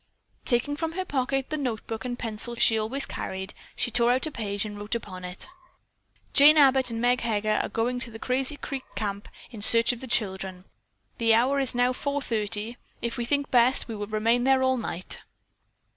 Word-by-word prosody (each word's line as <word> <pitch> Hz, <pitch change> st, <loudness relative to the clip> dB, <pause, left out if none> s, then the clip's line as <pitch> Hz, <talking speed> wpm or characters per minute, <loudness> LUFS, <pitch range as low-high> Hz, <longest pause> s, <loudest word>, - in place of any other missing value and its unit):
Taking 250 Hz, +4 st, +2 dB
from 325 Hz, +1 st, -3 dB
her 375 Hz, +2 st, -3 dB
pocket 270 Hz, -2 st, -1 dB
the 310 Hz, -, -1 dB
notebook 225 Hz, -4 st, -4 dB
and 245 Hz, -1 st, -4 dB
pencil 230 Hz, +1 st, -2 dB
she 230 Hz, -1 st, +4 dB
always 225 Hz, +6 st, -1 dB
carried, 190 Hz, +1 st, -5 dB, 0.2 s
she 240 Hz, -, -1 dB
tore 235 Hz, +1 st, +4 dB
out 255 Hz, +4 st, +1 dB
a 310 Hz, -, -4 dB
page 205 Hz, -4 st, -3 dB
and 210 Hz, -1 st, -6 dB
wrote 205 Hz, +3 st, -3 dB
upon 185 Hz, -5 st, -6 dB
it: 180 Hz, +1 st, -5 dB, 0.9 s
"Jane 300 Hz, +2 st, +8 dB
Abbott 265 Hz, -3 st, +5 dB
and 230 Hz, -1 st, -3 dB
Meg 245 Hz, +1 st, +2 dB
Heger 215 Hz, -2 st, 0 dB
are -, -, -4 dB
going 245 Hz, +2 st, -1 dB
to 245 Hz, -, -4 dB
the 225 Hz, -, -9 dB
Crazy 260 Hz, +4 st, -2 dB
Creek 275 Hz, -2 st, -5 dB
Camp 200 Hz, -2 st, -3 dB, 0.2 s
in 220 Hz, -4 st, -9 dB
search 230 Hz, +3 st, +5 dB
of 235 Hz, -, -9 dB
the 260 Hz, -, -6 dB
children. 190 Hz, -5 st, -1 dB, 0.5 s
The 225 Hz, -1 st, +4 dB
hour 260 Hz, +5 st, +2 dB
is 265 Hz, -3 st, 0 dB
now 245 Hz, +1 st, +2 dB
4:30. 230 Hz, -5 st, -2 dB, 0.3 s
If 235 Hz, 0 st, -2 dB
we 240 Hz, -, -2 dB
think 285 Hz, +3 st, -1 dB
best, 245 Hz, +1 st, +4 dB
we 225 Hz, -, -5 dB
will 205 Hz, -1 st, -5 dB
remain 225 Hz, +3 st, +1 dB
there 265 Hz, 0 st, +3 dB
all 260 Hz, 0 st, +2 dB
night." 185 Hz, -6 st, -5 dB
235 Hz, 195 wpm, -26 LUFS, 215-260 Hz, 0.9 s, Jane